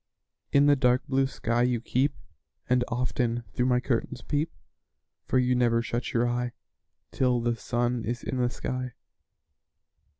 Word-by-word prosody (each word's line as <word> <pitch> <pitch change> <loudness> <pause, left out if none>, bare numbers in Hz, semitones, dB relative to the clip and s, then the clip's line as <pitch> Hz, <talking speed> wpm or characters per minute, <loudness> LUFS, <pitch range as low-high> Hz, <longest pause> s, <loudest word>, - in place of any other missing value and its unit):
In 140 0 +5
the 145 0 +6
dark 125 -1 +2
blue 135 0 +2
sky 120 -2 -1
you 125 -1 +2
keep, 130 +4 0 0.5
And 125 0 +3
often 120 -1 -1
through 125 - +1
my 125 -1 +3
curtains 125 0 -2
peep; 150 +2 -1 0.8
For - - +2
you 125 0 +3
never 120 -2 +2
shut 120 +1 -3
your 120 0 +2
eye 120 0 -1 0.6
Till 125 -2 +2
the 120 0 0
sun 120 0 -1
is 120 +2 -3
in 130 - -3
the 125 -1 +2
sky. 125 0 -4
125 Hz, 155 wpm, -27 LUFS, 120-130 Hz, 0.8 s, the